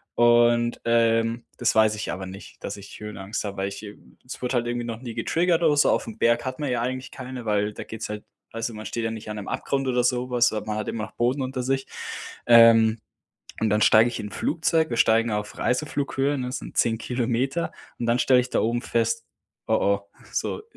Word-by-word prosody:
Und, 120 0 +4
ähm, 115 0 +2
das 120 - +2
weiß 110 -1 +4
ich 105 -4 -4
aber 95 +2 -5
nicht, 95 +2 -11
dass 100 - -4
ich 100 0 -11
Höhenangst 105 0 -5
habe, 100 -1 -4
weil, 95 +1 -2
ich, 100 +1 -8
äh 105 0 -9 0.3
es 125 - -8
wurde 125 +1 -1
halt 120 0 +1
irgendwie 120 0 -2
noch 115 -1 -5
nie 120 -3 -6
getriggert 170 +6 +1
oder 150 -3 +4
so, - - +5
auf - - +1
'm 115 -1 -8
Berg 120 +1 +2
hat 130 +2 -5
man 145 - -2
ja 120 -2 0
eigentlich 130 +1 -3
keine, 130 -2 -7
weil 105 0 +1
da - - -7
geht's 110 -1 -6
halt 105 0 -6 0.3
also, 115 +1 -3
man 110 0 -8
steht 115 - -3
ja 115 - -1
nicht 110 -1 -7
an 105 - -4
'nem 105 -2 -6
Abgrund 135 -1 -1
oder 125 -1 +2
so 125 0 0
was, 120 -2 +3
aber 105 - -3
man 105 0 -3
hat 110 - -3
immer 110 -2 -3
noch - - -7
Boden 125 +4 0
unter 130 -1 -3
sich. 135 +1 0 0.6
Ähm, 115 -1 +7 0.6
und 110 -2 +1
dann 105 +1 +2
steige 110 +3 +6
ich 120 - -5
in 105 - -5
'n - - -14
Flugzeug, 160 -1 +1
wir 120 - -1
steigen 115 +1 +3
auf 105 0 -3
Reiseflughöhe, 140 +1 0
ne, 125 -1 -3
das 125 - -3
sind - - -10
10 115 -1 +2
Kilometer. 125 +7 -1 0.3
Und 120 - -1
dann 120 +1 +2
stelle 125 0 +5
ich 125 - -5
da - - +1
oben 120 +2 0
fest: 115 -1 0 0.4
„Oh, - - +3
oh, 100 0 +2 0.3
so, 430 - -2
115 Hz, 235 wpm, -25 LUFS, 110-125 Hz, 0.6 s, Ähm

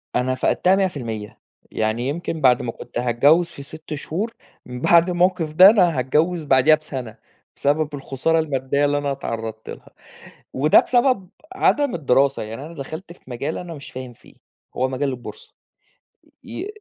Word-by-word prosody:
أنا 130 +1 +1
فقدتها 180 +8 +2
100% 120 - -3 0.3
يعني 110 +3 -1
يمكن 160 +1 -4
بعد 125 -3 +4
ما 120 - -3
كنت - - -10
هاتجوز 140 +8 +3
في 140 - -10
6 155 +2 -9
شهور 180 +10 -4 0.3
من 125 0 -8
بعد 170 +4 +5
الموقف 175 -3 +1
ده 185 +5 +9
أنا 180 - +3
هاتجوز 155 +6 0
بعديها 135 +2 +5
بسنة، 135 -7 -8 0.4
بسبب 145 +1 0
الخسارة 140 +4 -1
المادية 140 -2 0
اللي 145 0 +1
أنا 145 -1 -2
اتعرضت 115 -4 -6
لها، - - -10 0.6
وده 150 +4 +5
بسبب 240 -7 +1 0.3
عدم 290 - +2
الدراسة 140 -4 +2
يعني 115 +6 -7
أنا 165 - -10
دخَلت 160 +5 -8
في - - -22
مجال 135 +5 -4
أنا 175 -2 -7
مش 140 -2 -11
فاهم 130 -1 -8
فيه، - - -21 0.4
هو 130 +1 +1
مجال 135 +2 -2
البورصة 435 - -9 0.9
ي 385 - -6
145 Hz, 155 wpm, -21 LUFS, 130-170 Hz, 0.9 s, ده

